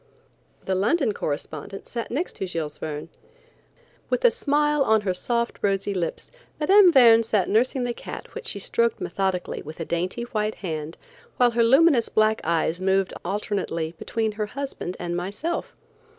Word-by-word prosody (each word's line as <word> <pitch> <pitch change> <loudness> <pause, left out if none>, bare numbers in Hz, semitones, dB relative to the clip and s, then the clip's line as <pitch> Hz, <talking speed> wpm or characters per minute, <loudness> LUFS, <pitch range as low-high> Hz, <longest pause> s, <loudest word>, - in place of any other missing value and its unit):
The 190 - 0
London 220 - +2
correspondent 155 +4 -5
sat 235 -2 -5
next 310 +9 -3
to 190 - -3
Jules 160 -4 -4
Verne. 150 +1 -5 1.0
With - - 0
a 485 - +7
smile 295 -2 +1
on 220 -4 +3
her 190 -3 -1
soft 235 +5 -1
rosy 200 0 0
lips, 175 -3 -4 0.3
Mme. 380 +5 +7
Verne 235 -6 +7
sat 215 -4 +1
nursing 250 +4 +2
the 245 0 -1
cat - - -9
which 470 0 -6
she - - -1
stroked 235 +3 0
methodically 190 -2 -2
with 155 +3 -10
a 165 - -3
dainty, 180 +8 -2
white 215 -2 -2
hand, 160 -3 -5 0.4
while 245 -1 +4
her 235 0 +2
luminous 265 0 +5
black 215 0 +2
eyes 165 +1 0
moved 190 0 +1
alternately 180 -4 -2
between 220 -1 -1
her 210 0 -3
husband 265 -7 -5
and 175 -1 -3
myself. 200 - -3
210 Hz, 160 wpm, -24 LUFS, 180-240 Hz, 1.0 s, a